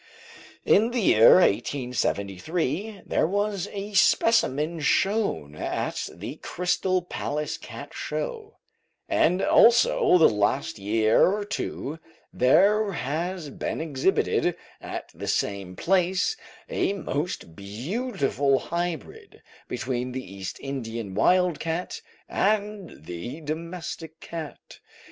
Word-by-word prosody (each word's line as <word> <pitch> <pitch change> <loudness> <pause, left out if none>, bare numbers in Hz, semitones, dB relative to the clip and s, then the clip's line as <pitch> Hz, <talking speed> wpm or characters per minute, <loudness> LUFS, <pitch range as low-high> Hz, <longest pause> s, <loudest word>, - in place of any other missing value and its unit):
In 220 +3 +5
the 245 0 -1
year 115 - +7
1873, 140 - 0
there - - +1
was 205 0 -1
a 205 +1 -6
specimen 170 - +3
shown 190 - +1
at - - -3
the 105 - -8
Crystal 180 +2 0
Palace 150 -3 -3
Cat - - -9
Show, 455 -3 -5 0.5
and 180 +2 +2
also 230 -5 +5
the 165 - +7
last 105 +3 0
year 110 +2 +3
or 205 +1 -2
two 165 -6 -4 0.3
there 200 - +4
has 165 +2 -3
been - - -4
exhibited 165 +3 +1 0.3
at - - -6
the - - -7
same 100 -3 -1
place 185 - +1 0.3
a 485 - 0
most 150 - -4
beautiful 140 - -1
hybrid 170 +1 -5 0.2
between 125 0 -3
the 125 -7 -6
East 95 -1 -6
Indian 115 -7 -5
wild 180 - +3
cat 165 +2 -3 0.3
and 205 - -1
the 90 - -6
domestic 165 +1 -6
cat. 165 -3 -8
165 Hz, 105 wpm, -26 LUFS, 125-195 Hz, 0.5 s, year